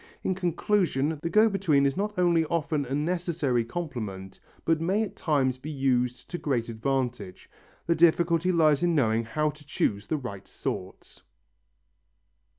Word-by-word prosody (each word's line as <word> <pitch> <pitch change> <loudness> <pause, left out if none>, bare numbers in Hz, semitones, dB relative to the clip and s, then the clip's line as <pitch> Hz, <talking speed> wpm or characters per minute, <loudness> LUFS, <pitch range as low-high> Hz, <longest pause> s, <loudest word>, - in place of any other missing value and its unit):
In 185 - +1
conclusion, 170 -4 0
the 170 - -2
go 215 +4 +5
between 175 -9 +2
is 135 - +1
not 210 +1 -2
only 170 -2 +3
often 155 -3 -1
a 135 +2 -3
necessary 155 -6 0
complement 115 - -6 0.3
but 160 -1 +2
may 195 +6 +1
at 210 - -6
times 130 -5 0
be 150 - -7
used 125 -4 0
to 175 - -3
great 120 -5 -1
advantage. 125 -4 -3 0.4
The 170 - +3
difficulty 170 +1 +3
lies 155 -4 +3
in 175 -1 +2
knowing 115 -5 +2
how 150 +6 0
to 150 0 -16
choose 105 -8 -1
the 155 - 0
right 100 -8 -7
sort. - - -6
150 Hz, 155 wpm, -27 LUFS, 130-170 Hz, 0.4 s, go